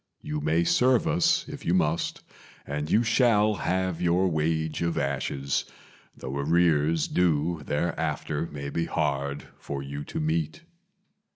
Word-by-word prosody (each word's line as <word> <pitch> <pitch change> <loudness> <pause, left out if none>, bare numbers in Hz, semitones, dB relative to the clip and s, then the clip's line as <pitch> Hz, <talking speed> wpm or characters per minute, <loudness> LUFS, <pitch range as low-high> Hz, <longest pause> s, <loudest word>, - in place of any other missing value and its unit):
You 75 0 -3
may 80 +3 +2
serve 125 - +3
us 170 +1 +2
if 145 -1 -8
you 85 - +1
must, 80 -2 0 0.4
and 75 +2 -3
you 115 - +4
shall 115 -3 +3
have 95 -1 -1
your 90 +2 +3
wage 80 0 -1
of 85 -1 0
ashes, 70 0 -1 0.5
Though 65 +2 -5
arrears 80 0 +2
due 85 -2 +1
thereafter 80 +1 -2
may 70 -2 -6
be 85 - -1
hard 70 -2 -1 0.2
for 70 -1 -5
you 70 +1 -6
to - - -5
meet. 80 0 -1
80 Hz, 135 wpm, -27 LUFS, 75-90 Hz, 0.5 s, you